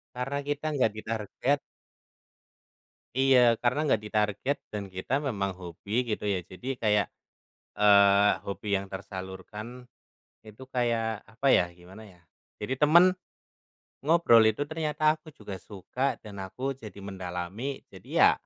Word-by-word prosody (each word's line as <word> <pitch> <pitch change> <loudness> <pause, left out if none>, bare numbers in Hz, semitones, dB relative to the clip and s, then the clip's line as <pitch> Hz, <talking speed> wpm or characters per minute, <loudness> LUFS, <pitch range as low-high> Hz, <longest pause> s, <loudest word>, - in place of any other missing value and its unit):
Karena 135 +3 -2
kita 145 +1 -2
enggak 125 -5 +3
ditarget 115 +6 -1 1.6
Iya, 125 -4 +5
karena 125 +5 +1
enggak 110 -6 +2
ditarget, 105 +6 0
dan 105 -2 -4
kita 95 +8 -2
memang 105 -9 -2
hobi 100 +7 -3
gitu - - -14
ya 90 -2 -2
jadi 95 +7 -9
kayak, 105 -2 +2 0.7
eee, 100 0 +6 0.2
hobi 100 +1 -5
yang 100 - -6
tersalurkan, 100 +5 -8 0.6
itu 110 +4 -12
kayak 115 -3 -1
apa 125 +5 -5
ya, 90 - +6
gimana 95 +5 -13
ya, 90 -3 -19 0.4
jadi 130 +5 -2
tema 155 +4 +7
n - - +7 1.0
ngobrol 150 -9 +6
itu 110 +5 +2
ternyata 155 -1 +1
aku 155 -2 -15
juga 100 -3 -8
suka 125 +8 -3
dan 105 -2 -10
aku 130 +7 -4
jadi 105 -5 -10
mendalami, 95 +7 -5
jadi - - -14
ya - - +8
110 Hz, 135 wpm, -28 LUFS, 100-130 Hz, 1.6 s, ya